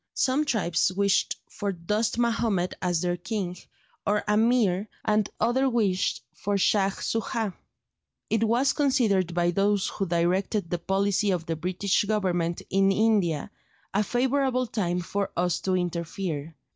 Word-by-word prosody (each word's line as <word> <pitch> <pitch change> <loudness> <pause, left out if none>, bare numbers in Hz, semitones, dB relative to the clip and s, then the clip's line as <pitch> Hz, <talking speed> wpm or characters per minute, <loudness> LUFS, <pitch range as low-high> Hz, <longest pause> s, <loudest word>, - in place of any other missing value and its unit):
Some 270 +4 +2
tribes 185 - +1
wished 200 +1 +1
for 200 -1 -3
Dost 210 +6 -1
Mahomed 230 -6 +1
as 175 -3 0
their 175 0 0
king, 185 -1 -3 0.5
or 210 +1 +1
Ameer, 210 -2 +2 0.2
and 215 -1 +2
others 255 +4 +2
wished 200 -6 0
for 205 +1 -2
Shaj 195 0 +2
Soojah. 225 -2 -1 0.7
It 225 0 +1
was 240 +5 +2
considered 220 - +1
by 175 0 +2
those 200 +2 +1
who 195 - -3
directed 175 +2 0
the 175 - -1
policy 200 +3 +1
of 180 -4 0
the 165 - -2
British 185 +5 0
Government 180 -5 0
in 195 0 +4
India, 200 -6 +1 0.4
a 200 - +3
favourable 255 +2 +1
time 180 -6 -1
for 200 +3 -2
us 180 -1 +1
to 190 -1 0
interfere. 170 -3 -3
195 Hz, 140 wpm, -26 LUFS, 180-220 Hz, 0.7 s, in